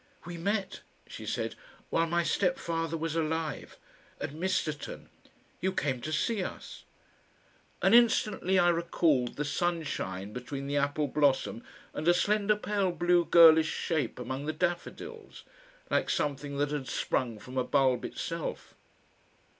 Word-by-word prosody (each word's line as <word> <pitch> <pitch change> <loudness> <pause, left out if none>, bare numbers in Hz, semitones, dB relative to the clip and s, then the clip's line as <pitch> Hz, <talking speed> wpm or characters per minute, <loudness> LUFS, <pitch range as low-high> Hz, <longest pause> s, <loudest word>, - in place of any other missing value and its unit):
"We 175 0 -6
met," 195 +3 -2 0.2
she - - -9
said, - - -2 0.4
"while 165 0 +2
my 170 +1 +1
step 180 0 +1
father 165 0 -2
was 165 0 -3
alive 160 -1 -2 0.4
at - - -4
Misterton. 160 -3 -3 0.5
You 190 - 0
came 135 -6 -1
to 155 - -4
see 200 +6 0
us"; - - -8 1.0
and 195 - +5
instantly 215 -5 +4
I 175 -1 +5
recalled 165 -6 +1
the 150 - -2
sunshine 145 - -2
between 135 +2 -5
the 140 +1 -2
apple 145 +1 +1
blossom 135 -4 +1 0.3
and 155 - -4
a 175 - +6
slender 210 +2 +2
pale 205 -3 0
blue 175 0 +2
girlish 160 -2 +7
shape 160 -4 -2
among 130 +4 -5
the 155 - -1
daffodils, 400 - -4 0.5
like - - +1
something 140 0 -1
that 145 +1 0
had 145 -3 -3
sprung 120 -2 -1
from 125 +5 -11
a - - +2
bulb 130 -2 +2
itself. - - -5
160 Hz, 140 wpm, -30 LUFS, 140-175 Hz, 1.0 s, girlish